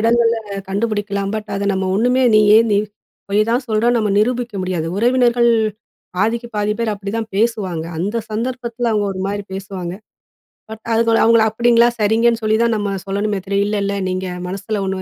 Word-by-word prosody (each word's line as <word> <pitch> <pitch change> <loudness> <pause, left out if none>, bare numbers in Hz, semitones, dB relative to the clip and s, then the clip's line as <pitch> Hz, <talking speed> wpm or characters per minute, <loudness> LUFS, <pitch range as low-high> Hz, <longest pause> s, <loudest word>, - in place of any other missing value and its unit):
இடங்கள்ல 230 +1 +3 0.3
கண்டுபிடிக்கலாம். 205 -1 -2
பட் 215 -1 -5
அதை 200 +1 -2
நம்ம 190 0 -1
ஒண்ணுமே 250 +4 +2
நீயே 210 +1 +6
நீ 200 - +3 0.5
பொய் 205 +1 +2
தான் 245 +2 0
சொல்றன்னு 235 +3 +2
நம்ம 210 -2 0
நிரூபிக்க 240 +1 0
முடியாது. 180 -3 -2
உறவினர்கள் 240 +1 +3 0.7
பாதிக்கு 230 +4 0
பாதி 210 0 +1
பேர் 225 -2 0
அப்டிதான் 215 +3 -4
பேசுவாங்க, 200 -7 0
அந்த 205 +6 -2
சந்தர்ப்பத்தில 235 +1 -2
அவுங்க 210 -2 +1
ஒரு 190 - -6
மாரி 205 0 -3
பேசுவாங்க, 190 -2 -5 0.8
பட் 220 0 -9
அதுக்கு 230 0 +2
அவுங்கள 230 0 +5
அப்டிங்களா 235 +1 +4
சரிங்கன்னு 225 +2 +2
சொல்லி 215 0 +2
தான் 235 -1 +2
நம்ம 205 -1 -2
சொல்லணுமே 200 +1 -1
தவிர, 200 +1 -3
இல்ல 210 0 -1
இல்ல 200 0 -1
நீங்க 185 +1 -2 0.2
மனசுல 200 +2 -3
ஒண்ணு 190 0 -2
215 Hz, 165 wpm, -18 LUFS, 200-235 Hz, 0.8 s, நீயே